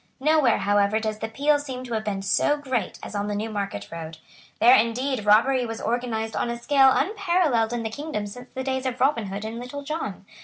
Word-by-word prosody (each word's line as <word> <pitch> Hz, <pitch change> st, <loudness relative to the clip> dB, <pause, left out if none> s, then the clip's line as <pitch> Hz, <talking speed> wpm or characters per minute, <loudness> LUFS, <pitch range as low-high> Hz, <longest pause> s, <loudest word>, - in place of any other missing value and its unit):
Nowhere, 295 Hz, -4 st, +3 dB
however, 205 Hz, +1 st, +2 dB
does 215 Hz, -1 st, -3 dB
the 220 Hz, -, -3 dB
peal 290 Hz, +6 st, +2 dB
seem 260 Hz, -3 st, -6 dB
to 245 Hz, -2 st, -6 dB
have 220 Hz, -1 st, -1 dB
been 195 Hz, -2 st, -3 dB
so 290 Hz, +8 st, +2 dB
great 260 Hz, -5 st, -3 dB
as -, -, -7 dB
on 205 Hz, 0 st, -2 dB
the 205 Hz, -, -2 dB
Newmarket 205 Hz, -, -4 dB
road. 165 Hz, -1 st, -7 dB, 0.4 s
There 245 Hz, +2 st, +7 dB
indeed 245 Hz, +1 st, 0 dB
robbery 250 Hz, +5 st, +4 dB
was 225 Hz, -1 st, -5 dB
organised 225 Hz, -1 st, -2 dB
on -, -, -1 dB
a 235 Hz, -, -3 dB
scale 270 Hz, +2 st, +5 dB
unparalleled 345 Hz, -, +1 dB
in 240 Hz, -1 st, -2 dB
the 220 Hz, -, -3 dB
kingdom 285 Hz, -4 st, -4 dB
since 245 Hz, +5 st, -10 dB
the 260 Hz, -, -3 dB
days 260 Hz, 0 st, -2 dB
of 250 Hz, -1 st, -4 dB
Robin 255 Hz, -6 st, +2 dB
Hood 200 Hz, +2 st, -5 dB
and 225 Hz, +2 st, -5 dB
Little 250 Hz, +4 st, -7 dB
John. 280 Hz, -, -5 dB
235 Hz, 215 wpm, -24 LUFS, 215-270 Hz, 0.4 s, There